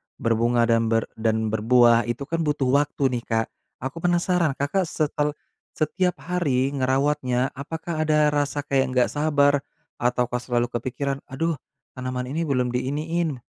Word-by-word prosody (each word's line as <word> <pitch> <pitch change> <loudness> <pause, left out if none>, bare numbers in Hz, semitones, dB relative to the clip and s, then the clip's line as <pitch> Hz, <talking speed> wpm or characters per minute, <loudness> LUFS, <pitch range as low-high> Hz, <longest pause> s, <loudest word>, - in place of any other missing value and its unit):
berbunga 115 +1 +2
dan 115 -1 +2
ber 115 0 +2 0.2
dan 110 -1 0
berbuah 120 +1 +4
itu 120 +4 -3
kan 165 +4 -3
butuh 145 -5 0
waktu 140 -2 0
nih, 120 -1 -2
Kak. 115 -1 0 0.4
Aku 135 +5 -4
penasaran 175 -3 +1
Kakak 165 +6 0
setel 150 -1 -1 0.4
setiap 180 +3 0
hari 145 -7 0
ngerawatnya, 130 -1 +1
apakah 155 +3 -4
ada 150 -1 +4
rasa 145 0 -1
kayak 135 -1 +1
enggak 125 -1 +3
sabar 145 -1 +3 0.4
ataukah 125 0 0
selalu 120 0 -1
kepikiran, 135 +3 -3
"Aduh 150 +2 -2 0.3
tanaman 130 -1 -4
ini 155 +6 -3
belum 125 -3 +1
di 125 +1 -1
iniin, 155 +1 -1
135 Hz, 145 wpm, -24 LUFS, 125-150 Hz, 0.4 s, berbuah